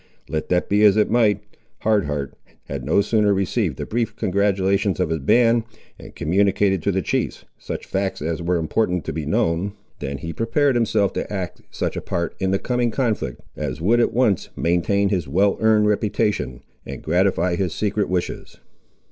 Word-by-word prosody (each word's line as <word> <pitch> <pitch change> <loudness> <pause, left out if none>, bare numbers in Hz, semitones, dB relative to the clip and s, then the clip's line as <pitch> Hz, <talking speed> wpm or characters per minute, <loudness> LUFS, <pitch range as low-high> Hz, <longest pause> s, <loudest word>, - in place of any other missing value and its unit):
Let 80 -1 -3
that 90 0 +1
be 105 +1 +2
as 105 -1 +6
it 105 - +2
might, 105 -4 +3 0.4
Hard 105 -3 +2
Heart 70 -2 -3 0.3
had - - -6
no - - +3
sooner 105 -1 +2
received 95 - 0
the 75 - -4
brief 115 +4 -2
congratulations 100 0 +1
of - - +1
his 80 - 0
band, 115 - +3 0.4
and - - -12
communicated 95 +3 +2
to 100 - +1
the 95 -1 -1
chiefs - - -2
such - - -6
facts 95 0 -2
as 80 +3 -3
were 85 +1 +1
important 90 +2 0
to - - -3
be 75 -1 -4
known, 85 +5 0 0.3
than 70 -1 -4
he 85 +3 -6
prepared 135 +5 +1
himself 110 -4 +1
to - - -4
act 95 -5 -4
such - - -3
a - - -3
part 85 -1 -2
in 95 - 0
the 95 - +2
coming 125 +2 0
conflict, 110 - -2
as 75 -2 -4
would 110 +9 +3
at 120 - +3
once 115 -6 +1
maintain 95 +4 +1
his 90 -7 -1
well 95 +8 +2
earned 110 -1 +4
reputation, 105 - 0 0.2
and - - -8
gratify 90 +1 +2
his 90 -1 -1
secret 105 +2 -1
wishes. 90 -1 -3
100 Hz, 180 wpm, -22 LUFS, 85-105 Hz, 0.4 s, as